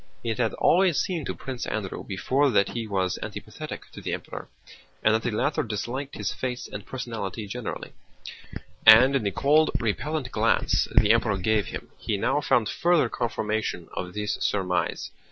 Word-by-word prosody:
It 115 Hz, 0 st, -2 dB
had 115 Hz, -3 st, +1 dB
always 180 Hz, -3 st, +3 dB
seemed 175 Hz, -7 st, -2 dB
to -, -, -3 dB
Prince 130 Hz, -2 st, -5 dB
Andrew 100 Hz, -4 st, -4 dB
before 135 Hz, +9 st, +1 dB
that 100 Hz, -5 st, +3 dB
he 115 Hz, -2 st, -4 dB
was 95 Hz, -3 st, -1 dB
antipathetic -, -, -7 dB
to -, -, -10 dB
the -, -, -3 dB
Emperor -, -, -8 dB, 0.6 s
and 110 Hz, -, +5 dB
that 110 Hz, -, +2 dB
the 120 Hz, -, -1 dB
latter 145 Hz, +8 st, 0 dB
disliked 125 Hz, +4 st, -4 dB
his -, -, -2 dB
face 125 Hz, -1 st, -4 dB
and 100 Hz, -, -7 dB
personality 115 Hz, -4 st, -5 dB
generally, 115 Hz, +4 st, -6 dB, 0.9 s
and 120 Hz, +6 st, +8 dB
in 135 Hz, -, +2 dB
the 100 Hz, -, 0 dB
cold, 150 Hz, +9 st, +3 dB
repellent 130 Hz, +5 st, -2 dB
glance -, -, +2 dB
the 105 Hz, -, +6 dB
Emperor 115 Hz, -3 st, +2 dB
gave 105 Hz, +2 st, +1 dB
him, -, -, -7 dB
he 105 Hz, -, -1 dB
now 135 Hz, +8 st, +1 dB
found 120 Hz, -6 st, +2 dB
further 170 Hz, -2 st, +2 dB
confirmation 110 Hz, -7 st, -2 dB
of 90 Hz, +1 st, -5 dB
this 105 Hz, 0 st, -2 dB
surmise. 90 Hz, -4 st, -1 dB
115 Hz, 170 wpm, -26 LUFS, 105-135 Hz, 0.9 s, and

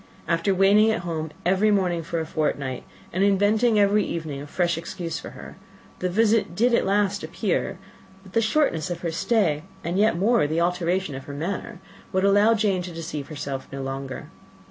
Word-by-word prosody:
After 165 Hz, +4 st, +1 dB
waiting 200 Hz, +3 st, +5 dB
at 220 Hz, -, 0 dB
home 160 Hz, -2 st, -3 dB, 0.2 s
every 190 Hz, +4 st, +3 dB
morning 185 Hz, -5 st, +1 dB
for 165 Hz, +1 st, -3 dB
a 160 Hz, -, -2 dB
fortnight, 145 Hz, -5 st, -2 dB, 0.3 s
and 185 Hz, +3 st, +1 dB
inventing 210 Hz, +3 st, +3 dB
every 205 Hz, +1 st, +4 dB
evening 155 Hz, -6 st, -4 dB
a 145 Hz, -, -8 dB
fresh 175 Hz, +2 st, 0 dB
excuse 170 Hz, 0 st, -5 dB
for -, -, -8 dB
her, -, -, -11 dB, 0.4 s
the 180 Hz, -, -1 dB
visitor 220 Hz, +2 st, +2 dB
did 240 Hz, +5 st, +3 dB
at 235 Hz, -, +2 dB
last 200 Hz, 0 st, +1 dB
appear; -, -, -2 dB, 0.5 s
but 190 Hz, -1 st, -15 dB
the 230 Hz, -, +3 dB
shortness 220 Hz, -, +1 dB
of 175 Hz, -, -4 dB
her 170 Hz, -, -2 dB
stay, 165 Hz, -4 st, +1 dB, 0.2 s
and, 175 Hz, +3 st, -1 dB
yet 210 Hz, -5 st, +3 dB
more, 215 Hz, -2 st, +3 dB
the 160 Hz, +2 st, -1 dB
alteration 180 Hz, -1 st, 0 dB
of 135 Hz, 0 st, -7 dB
her 145 Hz, -, -7 dB
manner, 190 Hz, +7 st, -4 dB, 0.3 s
would 190 Hz, 0 st, +1 dB
allow 205 Hz, +3 st, +5 dB
Jane 200 Hz, -4 st, +1 dB
to 180 Hz, 0 st, -6 dB
deceive 160 Hz, -4 st, -6 dB
herself 140 Hz, -3 st, -5 dB
no 135 Hz, 0 st, -5 dB
longer. 135 Hz, 0 st, -6 dB
180 Hz, 190 wpm, -24 LUFS, 160-205 Hz, 0.5 s, waiting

